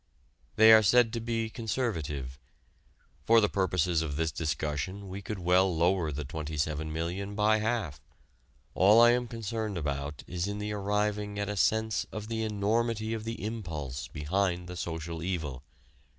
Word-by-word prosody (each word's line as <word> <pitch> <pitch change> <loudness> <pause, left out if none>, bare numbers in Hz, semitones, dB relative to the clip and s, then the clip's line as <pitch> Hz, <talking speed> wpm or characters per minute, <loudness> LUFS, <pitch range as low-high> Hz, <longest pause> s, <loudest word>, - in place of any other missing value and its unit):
They 110 +1 +8
are 110 - +8
said 115 +2 +4
to 115 - -1
be 115 0 -2
conservative. 80 - -3 0.8
For 115 +8 +6
the 105 - +3
purposes 90 -4 +1
of 75 -3 -3
this 80 +1 0
discussion 75 +5 -3
we 95 +2 -6
could 105 +1 -5
well 90 0 +3
lower 85 -1 +2
the 75 +1 -4
27,000,000 80 +6 -3
by 105 +1 +3
half. 110 - -2 0.7
All 105 +4 +6
I 120 0 +8
am 125 0 0
concerned 110 -3 -4
about 70 -2 -3
is 90 +1 -3
in 100 0 -4
arriving 105 0 -1
at 100 0 -2
a 105 - -2
sense 110 +2 +1
of 105 0 -6
the 115 -1 -2
enormity 110 +1 0
of 110 -1 -4
the 115 -2 -5
impulse 80 - -5
behind 90 +3 -1
the 90 - -7
"social 80 -1 -5
evil." 80 -8 -3
95 Hz, 150 wpm, -29 LUFS, 80-110 Hz, 0.8 s, They